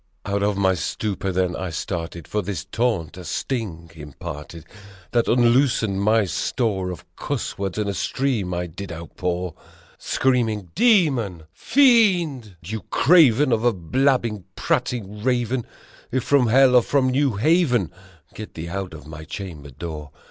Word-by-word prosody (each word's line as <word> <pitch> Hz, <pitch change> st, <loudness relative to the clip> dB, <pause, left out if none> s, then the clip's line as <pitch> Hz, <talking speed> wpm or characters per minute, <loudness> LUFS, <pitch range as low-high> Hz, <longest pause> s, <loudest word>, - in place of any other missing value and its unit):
Out 100 Hz, 0 st, 0 dB
my 95 Hz, -1 st, +3 dB
stupor 95 Hz, +3 st, -2 dB
then 90 Hz, -1 st, 0 dB
I 95 Hz, -, -4 dB
started 85 Hz, -1 st, -5 dB
for 105 Hz, -, -1 dB
this 95 Hz, -3 st, -5 dB
taunt 100 Hz, -5 st, -1 dB
a 90 Hz, -, -8 dB
sting 85 Hz, -7 st, -4 dB
imparted, 75 Hz, +1 st, -9 dB, 0.5 s
That 120 Hz, -1 st, +2 dB
unloosed 120 Hz, 0 st, +3 dB
my 105 Hz, +2 st, +2 dB
store 95 Hz, -2 st, -1 dB
of 90 Hz, -3 st, -7 dB
cuss -, -, -4 dB
words 95 Hz, -1 st, -3 dB
and 105 Hz, -1 st, -1 dB
a 100 Hz, -, -1 dB
stream 115 Hz, -2 st, -1 dB
I 90 Hz, 0 st, -2 dB
did 90 Hz, +3 st, -8 dB
outpour! 90 Hz, +1 st, -4 dB, 0.5 s
Screaming, 110 Hz, -8 st, 0 dB
"Demon! 135 Hz, -, +2 dB
Fiend! 190 Hz, -, +3 dB
You 110 Hz, +5 st, -5 dB
Craven 145 Hz, -4 st, +5 dB
of 115 Hz, -1 st, +1 dB
a 120 Hz, -1 st, +3 dB
blab 130 Hz, -, +1 dB
bing, 105 Hz, -6 st, -5 dB
prating 105 Hz, -4 st, -2 dB
Raven! 125 Hz, -1 st, 0 dB, 0.4 s
If 130 Hz, -1 st, 0 dB
from 140 Hz, -3 st, +3 dB
hell 130 Hz, +2 st, +5 dB
or 125 Hz, -, +8 dB
from 130 Hz, +1 st, +1 dB
New 135 Hz, -3 st, +1 dB
Haven, 125 Hz, -, +2 dB, 0.4 s
get 110 Hz, -, -9 dB
thee 80 Hz, +1 st, -6 dB
out 90 Hz, -6 st, -6 dB
my 80 Hz, 0 st, -9 dB
chamber 80 Hz, -4 st, -8 dB
door!" 75 Hz, +2 st, -7 dB
105 Hz, 145 wpm, -23 LUFS, 90-125 Hz, 0.5 s, or